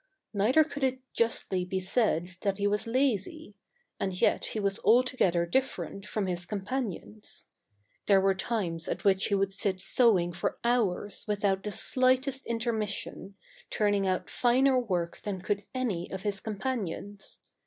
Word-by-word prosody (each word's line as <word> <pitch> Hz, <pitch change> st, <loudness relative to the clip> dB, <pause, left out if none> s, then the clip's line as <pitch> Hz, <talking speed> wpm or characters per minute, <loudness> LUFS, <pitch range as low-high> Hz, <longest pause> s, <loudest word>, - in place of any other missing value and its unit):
Neither 225 Hz, +10 st, +4 dB
could 285 Hz, -2 st, -6 dB
it 260 Hz, 0 st, +1 dB
justly 210 Hz, -5 st, 0 dB
be 185 Hz, +1 st, -2 dB
said 185 Hz, -3 st, 0 dB
that 195 Hz, -1 st, 0 dB
he 200 Hz, -, -1 dB
was 210 Hz, +2 st, +1 dB
lazy; 255 Hz, -, 0 dB, 0.5 s
and 190 Hz, -2 st, -2 dB
yet -, -, +2 dB
he 220 Hz, -, -3 dB
was 200 Hz, -1 st, 0 dB
altogether 225 Hz, -8 st, +3 dB
dif 265 Hz, +10 st, 0 dB
ferent 200 Hz, +1 st, -7 dB
from 210 Hz, -1 st, -1 dB
his 175 Hz, -1 st, -3 dB
companions. 195 Hz, -, -5 dB, 0.6 s
There 195 Hz, -2 st, +6 dB
were 195 Hz, 0 st, +3 dB
times 185 Hz, -5 st, -2 dB
at -, -, -3 dB
which 195 Hz, -1 st, +3 dB
he 200 Hz, -, +1 dB
would 195 Hz, 0 st, 0 dB
sit 195 Hz, -1 st, +1 dB
sewing 195 Hz, -3 st, +4 dB
for 175 Hz, -, -2 dB
hours 220 Hz, -5 st, 0 dB
without 200 Hz, -2 st, +1 dB
the 210 Hz, -, -4 dB
slightest 260 Hz, +5 st, +1 dB
intermission, 220 Hz, -4 st, -3 dB, 0.3 s
turning 205 Hz, -2 st, +1 dB
out 185 Hz, -1 st, -1 dB
finer 255 Hz, +2 st, +3 dB
work 180 Hz, -8 st, -2 dB
than 200 Hz, -3 st, -4 dB
could 205 Hz, +1 st, -2 dB
any 210 Hz, -10 st, -2 dB
of 190 Hz, 0 st, -5 dB
his 205 Hz, -2 st, -1 dB
companions. 205 Hz, -3 st, -5 dB
205 Hz, 155 wpm, -29 LUFS, 190-235 Hz, 0.6 s, There